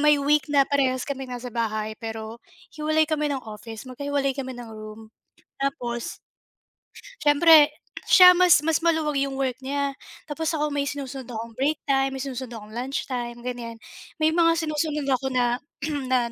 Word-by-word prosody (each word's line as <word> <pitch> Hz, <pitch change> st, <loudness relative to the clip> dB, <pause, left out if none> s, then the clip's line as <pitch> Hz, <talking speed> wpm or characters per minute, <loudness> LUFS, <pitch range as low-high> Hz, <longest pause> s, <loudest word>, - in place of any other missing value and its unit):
may 300 Hz, 0 st, +5 dB
week 290 Hz, 0 st, +2 dB
na 280 Hz, -1 st, +4 dB
parehas 260 Hz, -3 st, +1 dB
kami 270 Hz, -2 st, -4 dB
nasa 250 Hz, 0 st, -6 dB
bahay 215 Hz, -2 st, -2 dB
pero 225 Hz, 0 st, -6 dB, 0.3 s
hiwalay 310 Hz, +1 st, +1 dB
kami 300 Hz, -2 st, 0 dB
ng 265 Hz, -2 st, -4 dB
office 220 Hz, +1 st, -9 dB
magkahiwalay 280 Hz, +1 st, -1 dB
kami 260 Hz, -2 st, -4 dB
ng 240 Hz, -1 st, -9 dB
room 215 Hz, 0 st, -9 dB, 0.6 s
tapos 245 Hz, -4 st, -3 dB, 1.0 s
siyempre, 300 Hz, 0 st, +7 dB, 0.4 s
siya 360 Hz, -1 st, +9 dB
mas 355 Hz, -4 st, +5 dB
mas 320 Hz, 0 st, +2 dB
maluwag 315 Hz, -4 st, +1 dB
'yong 275 Hz, 0 st, -1 dB
work 260 Hz, -2 st, -1 dB
niya 280 Hz, +1 st, -1 dB, 0.3 s
tapos 315 Hz, +1 st, -4 dB
ako 300 Hz, -1 st, -1 dB
may 280 Hz, 0 st, -1 dB
sinusunod 270 Hz, -3 st, -6 dB
akong 230 Hz, 0 st, -6 dB
break 285 Hz, +5 st, 0 dB
time, 270 Hz, -1 st, +2 dB
may 265 Hz, -, -4 dB
sinusunod 260 Hz, -3 st, -6 dB
akong 210 Hz, 0 st, -12 dB
lunchtime, 245 Hz, -1 st, -4 dB
ganyan. 240 Hz, -2 st, -5 dB, 0.4 s
May 315 Hz, 0 st, +3 dB
mga 330 Hz, 0 st, +4 dB
sinusunod 300 Hz, -1 st, -1 dB
ako 265 Hz, -1 st, 0 dB
na 245 Hz, -1 st, +1 dB, 0.5 s
na, 245 Hz, -2 st, +1 dB
270 Hz, 160 wpm, -25 LUFS, 240-295 Hz, 1.0 s, siya